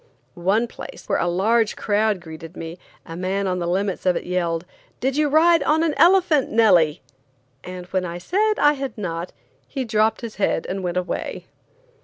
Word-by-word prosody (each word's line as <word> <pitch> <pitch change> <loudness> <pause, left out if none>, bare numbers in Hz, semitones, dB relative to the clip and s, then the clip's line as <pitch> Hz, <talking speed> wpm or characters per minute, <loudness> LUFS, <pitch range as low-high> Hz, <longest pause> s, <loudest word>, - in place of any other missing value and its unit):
One 195 +7 +1
place, - - -10
where - - 0
a - - 0
large 215 +5 +2
crowd 210 -2 0
greeted 165 +1 -10
me, 165 +2 -7 0.3
a 165 - -8
man 190 +3 -1
on 180 -1 -1
the 170 - -2
limits 190 +2 -1
of 180 - +4
it - - -2
yelled: 175 -2 -1 0.3
"Did 265 +1 -1
you 300 0 +2
ride 330 +2 +5
on 315 +3 +2
an 320 -2 +1
elephant, 340 -2 +4
Nellie?" 180 -8 +4 0.6
and 180 0 -7
when 185 0 -2
I 175 -1 -5
said 415 - +1
I 295 0 +5
had 275 -3 -5
not, 170 -3 -4 0.4
he 265 -3 -4
dropped 220 -1 +1
his 230 -4 -7
head 195 -4 0
and 195 +1 -3
went 180 -1 -2
away. 180 0 -3
195 Hz, 185 wpm, -22 LUFS, 175-265 Hz, 0.6 s, ride